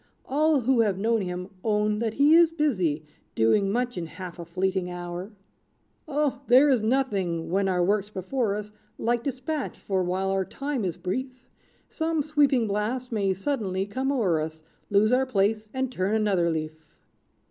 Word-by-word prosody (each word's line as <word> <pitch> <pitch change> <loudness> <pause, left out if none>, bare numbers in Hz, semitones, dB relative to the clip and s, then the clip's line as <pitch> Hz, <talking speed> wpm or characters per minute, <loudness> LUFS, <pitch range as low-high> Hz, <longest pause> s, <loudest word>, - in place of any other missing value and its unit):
All 300 0 +2
who 250 +1 +2
have 205 -4 +1
known 225 +2 +1
him 180 -1 -4 0.2
own 210 -1 +1
that 225 -1 -2
he 290 +3 +5
is 335 0 +7
busy, 185 - 0 0.3
Doing 195 - +3
much 245 -2 -1
in 165 - -4
half 180 +1 -9
a 170 - -6
fleeting 185 +1 -1
hour. 175 +2 -6 0.8
"Oh! 285 -2 0
there 260 +4 +6
is 250 -4 +3
nothing 195 -9 0
when 195 +1 +2
our 180 -2 +1
work's 205 +2 +1
before 210 +2 -1
us, 210 0 -6 0.3
Like 235 0 0
despatch; 275 +3 -3
for, 190 -2 -1
while 185 +2 -1
our 195 0 +1
time 275 +3 -4
is 175 - -3
brief, 255 +9 -3 0.6
Some 320 -2 -1
sweeping 285 -5 +3
blast 220 +5 -2
may 200 -4 +1
suddenly 195 -4 -2
come 260 +7 -2
o'er 190 - +1
us, 160 0 -6 0.3
Lose 210 +3 +3
our 260 +1 +3
place, 215 -1 0
and 260 +1 -2
turn 195 -1 0
another 195 -6 +2
leaf! 155 -1 -4
210 Hz, 170 wpm, -26 LUFS, 185-260 Hz, 0.8 s, is